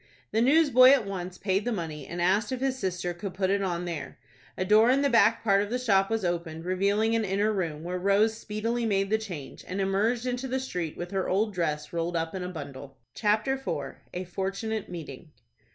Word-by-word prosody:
The 220 Hz, -, +2 dB
newsboy 260 Hz, -2 st, +6 dB
at 265 Hz, -5 st, +5 dB
once 185 Hz, -2 st, -5 dB
paid 195 Hz, 0 st, 0 dB
the 245 Hz, -, -1 dB
money, 160 Hz, -, -4 dB
and 175 Hz, -, -6 dB
asked 195 Hz, +6 st, +2 dB
if 260 Hz, -, -2 dB
his 265 Hz, 0 st, 0 dB
sister 180 Hz, -3 st, -2 dB
could 185 Hz, +2 st, -6 dB
put 190 Hz, 0 st, +1 dB
it 200 Hz, 0 st, +1 dB
on 180 Hz, -2 st, -2 dB
there. 165 Hz, -4 st, -5 dB, 0.4 s
A 185 Hz, -, -1 dB
door 215 Hz, +4 st, +5 dB
in 270 Hz, +2 st, +3 dB
the 280 Hz, -, +2 dB
back 230 Hz, -1 st, +4 dB
part 200 Hz, -3 st, +4 dB
of 205 Hz, -, -3 dB
the 245 Hz, -, 0 dB
shop 195 Hz, -6 st, +2 dB
was 225 Hz, -3 st, -1 dB
opened, 170 Hz, -2 st, -3 dB
revealing 200 Hz, +4 st, +1 dB
an 225 Hz, -, +1 dB
inner 205 Hz, +2 st, +1 dB
room, 165 Hz, -6 st, -3 dB
where 180 Hz, +1 st, -3 dB
Rose 200 Hz, +4 st, +3 dB
speedily 225 Hz, +2 st, -2 dB
made 195 Hz, -1 st, 0 dB
the 220 Hz, -, +3 dB
change, 175 Hz, -11 st, -8 dB
and 185 Hz, +2 st, -4 dB
emerged 210 Hz, +5 st, +1 dB
into 250 Hz, +1 st, -2 dB
the 260 Hz, +1 st, -1 dB
street 180 Hz, -11 st, -4 dB
with 175 Hz, +1 st, -6 dB
her 195 Hz, -1 st, -1 dB
old 210 Hz, +3 st, +1 dB
dress 150 Hz, -4 st, -2 dB
rolled 170 Hz, +1 st, -2 dB
up 165 Hz, 0 st, -1 dB
in 190 Hz, -, -4 dB
a 180 Hz, -, -4 dB
bundle. 140 Hz, -5 st, -8 dB, 0.2 s
CHAPTER 215 Hz, +5 st, +1 dB
IV. 150 Hz, -, -4 dB, 0.2 s
A 180 Hz, -, -2 dB
FORTUNATE 195 Hz, +4 st, -3 dB
MEETING. 160 Hz, -4 st, -8 dB
195 Hz, 215 wpm, -28 LUFS, 175-225 Hz, 0.4 s, newsboy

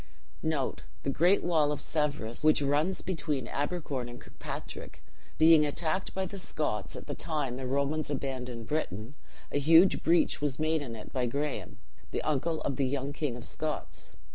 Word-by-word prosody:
The 140 Hz, -2 st, -2 dB
great 175 Hz, +8 st, +4 dB
wall 160 Hz, -4 st, +3 dB
of 150 Hz, -, -2 dB
Severus, 145 Hz, -7 st, -1 dB
which 155 Hz, 0 st, +6 dB
runs 150 Hz, +7 st, +1 dB
between 150 Hz, -9 st, -2 dB
Abercorn 145 Hz, -4 st, -2 dB
and 120 Hz, 0 st, -9 dB
Kirkpatrick, -, -, -8 dB, 0.3 s
being 160 Hz, -1 st, +7 dB
attacked 160 Hz, +5 st, -1 dB
by 190 Hz, 0 st, 0 dB
the 195 Hz, +2 st, -6 dB
Scotts -, -, -2 dB
at -, -, -7 dB
the -, -, -4 dB
time 145 Hz, -6 st, -2 dB
the 130 Hz, -1 st, -4 dB
Romans 140 Hz, +3 st, 0 dB
abandoned 125 Hz, -4 st, -3 dB
Britain, 115 Hz, -5 st, -2 dB, 0.4 s
a 145 Hz, -, +1 dB
huge 165 Hz, +6 st, +6 dB
breach 170 Hz, -2 st, +3 dB
was 145 Hz, -3 st, 0 dB
made 155 Hz, 0 st, +1 dB
in 120 Hz, -5 st, -5 dB
it 110 Hz, -, -10 dB
by 125 Hz, -2 st, +1 dB
Graham 145 Hz, +4 st, -1 dB
(or -, -, -4 dB
Greame), -, -, -13 dB, 0.3 s
the -, -, -2 dB
uncle 155 Hz, +2 st, 0 dB
of 140 Hz, -, -2 dB
the 135 Hz, -, +2 dB
young 140 Hz, +1 st, -2 dB
king 145 Hz, -5 st, -2 dB
of 120 Hz, -, -7 dB
Scots. 155 Hz, -1 st, -4 dB
145 Hz, 175 wpm, -30 LUFS, 135-160 Hz, 0.4 s, being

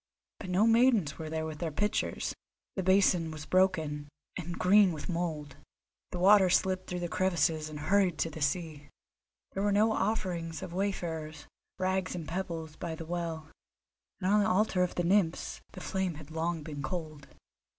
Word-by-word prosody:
But 190 Hz, -, -7 dB
no 185 Hz, +4 st, +3 dB
maidens 230 Hz, -, +3 dB
were 160 Hz, -1 st, -5 dB
there 160 Hz, 0 st, -2 dB
with 155 Hz, -1 st, -6 dB
their 165 Hz, -, -1 dB
pitchers; 210 Hz, +7 st, -1 dB, 0.4 s
the 190 Hz, -, -1 dB
basin 185 Hz, -3 st, +3 dB
was 155 Hz, -1 st, -7 dB
broken, 160 Hz, -6 st, +1 dB, 0.3 s
and 175 Hz, -1 st, -5 dB
green 195 Hz, 0 st, +5 dB
with 155 Hz, -, -6 dB
mould; 160 Hz, -5 st, -3 dB, 0.5 s
the -, -, -5 dB
water 190 Hz, +1 st, +6 dB
slipped 185 Hz, +1 st, +1 dB
through 180 Hz, -1 st, -3 dB
the 175 Hz, -, -1 dB
crevices 165 Hz, -4 st, +1 dB
and 150 Hz, -1 st, -7 dB
hurried 185 Hz, +1 st, +2 dB
to 165 Hz, -, -1 dB
the 155 Hz, -, -8 dB
sea. 150 Hz, -2 st, -2 dB, 0.6 s
There 195 Hz, -, -3 dB
were 205 Hz, 0 st, +2 dB
no 215 Hz, +2 st, +4 dB
offerings 180 Hz, -8 st, -2 dB
of 170 Hz, -, -7 dB
wayfarers, 165 Hz, -5 st, -3 dB, 0.3 s
rags 185 Hz, 0 st, -1 dB
and 165 Hz, -3 st, -5 dB
pebbles, 165 Hz, -4 st, -4 dB
by 170 Hz, -2 st, -4 dB
the 165 Hz, -, -7 dB
well; 165 Hz, -2 st, -4 dB, 0.7 s
and 185 Hz, -, -1 dB
on 210 Hz, -, +5 dB
the 210 Hz, +1 st, +2 dB
altar 195 Hz, -1 st, +2 dB
of 180 Hz, -, 0 dB
the 175 Hz, -, 0 dB
Nymphs 175 Hz, -2 st, +1 dB
the -, -, -8 dB
flame 190 Hz, -3 st, -2 dB
had 155 Hz, 0 st, -11 dB
long 165 Hz, 0 st, -2 dB
been 145 Hz, -2 st, -6 dB
cold. 155 Hz, -1 st, -5 dB
175 Hz, 175 wpm, -30 LUFS, 160-190 Hz, 0.7 s, water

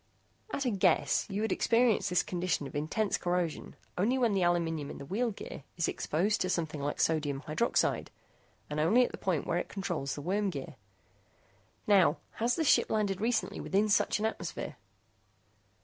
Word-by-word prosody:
At 280 Hz, -, -2 dB
a 250 Hz, -, +2 dB
guess, 180 Hz, -8 st, +2 dB
you 205 Hz, +2 st, -2 dB
would 220 Hz, -, -1 dB
experience 235 Hz, -1 st, +3 dB
this 180 Hz, 0 st, +2 dB
condition 180 Hz, -4 st, -1 dB
of -, -, -8 dB
intense 175 Hz, +8 st, 0 dB
corrosion 175 Hz, -2 st, -2 dB, 0.2 s
only 235 Hz, +8 st, +2 dB
when 240 Hz, -5 st, +2 dB
the 195 Hz, -, +1 dB
aluminum 165 Hz, -4 st, 0 dB
in -, -, -7 dB
the 140 Hz, -, -8 dB
wheel 230 Hz, -, 0 dB
gear 200 Hz, -8 st, -8 dB
is 170 Hz, -, +1 dB
exposed 195 Hz, +8 st, 0 dB
to 185 Hz, -, 0 dB
something 160 Hz, -4 st, -2 dB
like 145 Hz, +1 st, -2 dB
sodium 150 Hz, -4 st, +1 dB
hydroxide, 160 Hz, +10 st, 0 dB, 0.6 s
and 150 Hz, 0 st, -3 dB
only 215 Hz, +11 st, +5 dB
at -, -, -6 dB
the -, -, -8 dB
point 180 Hz, -6 st, 0 dB
where 170 Hz, -, 0 dB
it -, -, -5 dB
controls 175 Hz, -9 st, -3 dB
the 145 Hz, -, -6 dB
worm 200 Hz, +4 st, 0 dB
gear. 150 Hz, -2 st, -6 dB, 1.1 s
Now, 190 Hz, -6 st, +5 dB, 0.2 s
has 235 Hz, +2 st, +1 dB
this 320 Hz, -, 0 dB
ship -, -, +4 dB
landed 205 Hz, -3 st, 0 dB
recently 230 Hz, +1 st, 0 dB
within 200 Hz, +3 st, +1 dB
such 210 Hz, -, +3 dB
an 215 Hz, -, -1 dB
atmosphere?" 220 Hz, -, -4 dB
185 Hz, 180 wpm, -31 LUFS, 160-215 Hz, 1.1 s, only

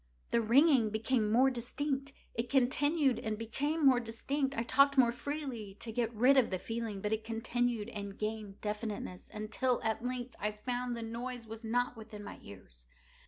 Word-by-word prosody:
The 235 Hz, -, +3 dB
ringing 250 Hz, 0 st, +5 dB
became 220 Hz, 0 st, +1 dB
more 260 Hz, +4 st, +5 dB
distinct:—it 265 Hz, -1 st, -4 dB
continued 275 Hz, +2 st, +3 dB
and 220 Hz, -1 st, -2 dB
became 285 Hz, +8 st, -1 dB
more 260 Hz, -2 st, +7 dB
distinct: 270 Hz, +4 st, -2 dB
I 230 Hz, -, +1 dB
talked 275 Hz, +3 st, +4 dB
more 245 Hz, -3 st, +6 dB
freely 245 Hz, -7 st, -5 dB
to 230 Hz, -, -5 dB
get 230 Hz, 0 st, 0 dB
rid 250 Hz, +5 st, +5 dB
of 255 Hz, -, +5 dB
the 185 Hz, -, -1 dB
feeling: 225 Hz, 0 st, -4 dB
but 210 Hz, +2 st, 0 dB
it 220 Hz, 0 st, -1 dB
continued 230 Hz, 0 st, -1 dB
and 200 Hz, -3 st, -6 dB
gained 215 Hz, -2 st, -4 dB
definiteness—until, 215 Hz, +3 st, -2 dB
at 220 Hz, +1 st, -1 dB
length, 250 Hz, 0 st, -4 dB
I 210 Hz, 0 st, -1 dB
found 245 Hz, +3 st, -3 dB
that 230 Hz, -, -4 dB
the -, -, -5 dB
noise 240 Hz, +1 st, -5 dB
was 225 Hz, +1 st, -8 dB
not 245 Hz, +2 st, 0 dB
within 215 Hz, -2 st, -9 dB
my -, -, -8 dB
ears. -, -, -14 dB
235 Hz, 170 wpm, -33 LUFS, 215-255 Hz, -, more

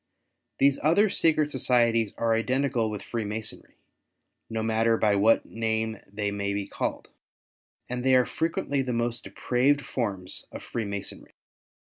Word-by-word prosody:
These 140 Hz, 0 st, +3 dB
other 190 Hz, +7 st, +4 dB
secret 155 Hz, -5 st, +2 dB
societies 115 Hz, -4 st, +2 dB
are 115 Hz, -1 st, +2 dB
identical 125 Hz, 0 st, +1 dB
with 105 Hz, -2 st, -5 dB
Freemasonry, 110 Hz, -2 st, -4 dB, 0.7 s
no 110 Hz, 0 st, -2 dB
matter 115 Hz, +1 st, +2 dB
by 105 Hz, -2 st, +3 dB
what 105 Hz, +3 st, +4 dB
name 110 Hz, -1 st, -2 dB
they 100 Hz, 0 st, -2 dB
may 100 Hz, 0 st, -2 dB
be 100 Hz, -1 st, -2 dB
called; -, -, -4 dB, 0.8 s
and 125 Hz, 0 st, -4 dB
they 130 Hz, 0 st, +5 dB
are 125 Hz, -1 st, +5 dB
frequently 145 Hz, -4 st, -1 dB
the 130 Hz, -2 st, -2 dB
most 120 Hz, 0 st, -2 dB
depraved 135 Hz, +4 st, +1 dB
forms 100 Hz, -7 st, -3 dB
of -, -, -8 dB
Freemasonry. 100 Hz, -4 st, -5 dB
115 Hz, 135 wpm, -27 LUFS, 110-130 Hz, 0.8 s, they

